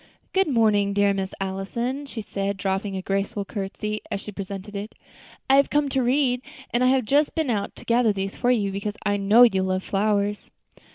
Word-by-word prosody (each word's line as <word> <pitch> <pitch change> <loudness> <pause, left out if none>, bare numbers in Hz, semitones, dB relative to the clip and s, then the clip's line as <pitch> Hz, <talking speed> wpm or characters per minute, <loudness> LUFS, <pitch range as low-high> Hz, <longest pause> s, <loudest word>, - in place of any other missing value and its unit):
"Good 385 -1 +3
morning, 215 -6 +3
dear 200 0 +3
Miss 195 -1 -3
Allison," 235 +9 -3
she 225 -5 -6
said, 200 0 -3
dropping 195 +1 -2
a 190 - -4
graceful 195 +1 -2
courtesy 210 +1 -4
as - - -2
she 210 - -8
presented 200 +1 -7
it. 205 +2 -6 0.5
"I 270 - +5
have 280 - +4
come 295 -1 +1
to 265 0 +1
read, 250 0 +2 0.3
and 240 +1 +1
I - - +5
have 260 -2 +3
just 285 +6 +2
been 315 -6 0
out 205 -3 -2
to - - -12
gather 235 -1 +3
these 195 -1 -3
for 245 - 0
you, 210 -5 +2
because 200 +2 -4
I 205 0 +2
know 205 +4 +6
you 195 -6 +4
love 185 0 -1
flowers." 205 0 0
205 Hz, 205 wpm, -24 LUFS, 195-245 Hz, 0.5 s, know